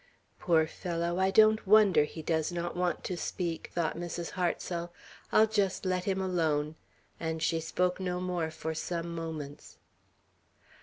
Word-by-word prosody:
"Poor 160 -2 +3
fellow! 170 +1 -2
I 190 0 +3
don't 215 +1 +5
wonder 200 -7 +6
he 160 +1 -8
does 160 0 0
not 175 0 -3
want 175 -2 -1
to 180 - -3
speak," 170 -1 -3
thought 170 -2 0
Mrs. 175 0 -4
Hartsel. 175 -1 -2 0.4
"I'll 220 - +6
just 200 -3 0
let 185 -1 0
him 190 -1 0
alone;" 160 -5 0 0.5
and 160 -1 -2
she 165 0 +2
spoke 180 +3 0
no 180 -1 -2
more 180 -3 -1
for 160 0 -4
some 170 +1 -3
moments. 155 -3 -6
175 Hz, 150 wpm, -30 LUFS, 160-185 Hz, 0.5 s, wonder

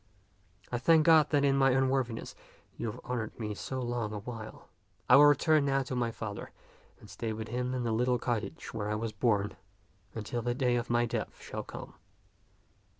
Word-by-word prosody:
I 120 - -1
thank 160 +2 +5
God 160 -3 +6
that 145 -2 +3
in 135 -1 +3
my 135 -1 +4
un 135 0 +3
worthiness 130 -4 -2 0.4
you 120 - -4
have - - -10
honored 120 -3 -4
me 105 -2 -3
so 130 +5 -5
long 120 -3 -2
a - - -3
while. 110 +1 -8 0.4
I 125 - +8
will 145 +2 +9
return 145 +1 +4
now 135 -1 +2
to 130 0 -5
my 120 -1 0
father 110 -3 -6 0.5
and - - -14
stay 110 -1 -4
with 110 0 -6
him 125 +2 -2
in 125 - -2
the 115 - -1
little 125 +3 +2
cottage 115 -4 -3
where 105 -2 -3
I 105 - 0
was 110 +1 -3
born 105 -4 0 0.6
until 115 +2 -3
the 120 +1 -1
day 125 -2 +2
of 120 0 -2
my 120 0 +3
death 115 -1 -4
shall - - -6
come. - - -9
120 Hz, 200 wpm, -31 LUFS, 110-130 Hz, 0.6 s, will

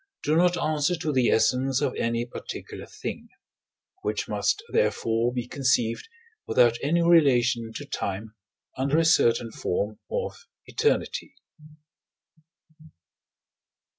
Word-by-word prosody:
do 150 - +1
not 175 +1 +3
answer 155 0 +1
to 160 -2 -2
the 130 -3 +3
essence 125 +4 +2
of 140 -3 0
any 115 +1 -1
particular 120 - -8
thing: - - -7 0.7
which - - -2
must 420 - 0
therefore 115 - +1
be 125 -1 -4
conceived 125 -4 0 0.4
without 120 -1 +3
any 170 +4 +2
relation 125 -9 +3
to 145 +6 -7
time, 105 -3 -4 0.4
under 140 +3 +1
a 165 - +3
certain 120 -7 +3
form 105 +1 -3
of 480 -1 -4 0.2
eternity. 450 - -1
130 Hz, 110 wpm, -26 LUFS, 115-160 Hz, 0.7 s, not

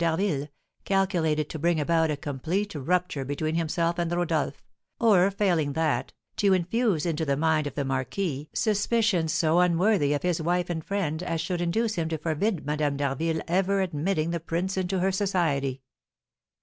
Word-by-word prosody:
d'Harville, 165 -3 0 0.4
calculated 170 -6 +1
to 160 - -5
bring 170 +1 +2
about 160 +1 +2
a 150 - -1
complete 160 +9 -2
rupture 165 0 -1
between 145 +4 -2
himself 170 +1 0
and 170 -1 -1
Rodolph; 165 -5 -1 0.4
or, 200 -5 +5
failing 180 -8 +1
that, 145 -5 0 0.3
to 200 -2 +4
infuse 185 -1 +1
into 165 -2 -1
the 140 -3 0
mind 155 -1 +2
of - - -7
the 140 - -1
marquis 140 +3 -2
suspicions 210 -5 +1
so 160 +1 +2
unworthy 180 -3 +3
of 145 - -2
his 175 -2 0
wife 175 +2 0
and 160 -2 -3
friend 170 -5 -2
as 165 -2 -2
should 175 +2 -2
induce 215 +6 0
him 160 -1 -1
to 160 - -2
forbid 165 +4 -1
Madame 150 -1 0
d'Harville 155 +4 -1
ever 190 +3 +1
admitting 170 -1 -1
the 170 - -1
prince 170 +4 -2
into 185 0 -1
her 190 +1 +2
society. 155 -9 0
165 Hz, 165 wpm, -26 LUFS, 150-185 Hz, 0.4 s, or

